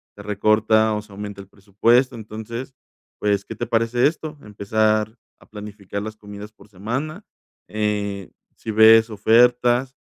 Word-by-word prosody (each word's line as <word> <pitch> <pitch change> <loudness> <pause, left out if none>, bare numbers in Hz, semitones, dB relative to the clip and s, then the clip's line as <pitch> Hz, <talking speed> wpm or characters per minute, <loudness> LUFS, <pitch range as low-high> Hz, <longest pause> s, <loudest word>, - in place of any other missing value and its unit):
se 100 - -11
recorta 110 +1 +2
o 105 - -3
se 105 -1 -19
aumenta 100 0 -7
el 100 - -15
presupuesto, 115 +6 +1
entonces, 115 +4 -8 0.5
pues, 100 -1 0
¿qué - - -7
te 120 - -4
parece 115 +3 +2
esto? 155 -1 -5
Empezar 110 +1 0 0.3
a - - -20
planificar 105 -1 -8
las 110 +1 -7
comidas 105 0 -10
por 105 - -20
semana, 130 - -5 0.5
eh, 105 -2 -3 0.2
si 110 - -6
ves 110 +1 +6
ofertas, 120 +4 +3
110 Hz, 145 wpm, -21 LUFS, 105-115 Hz, 0.5 s, ves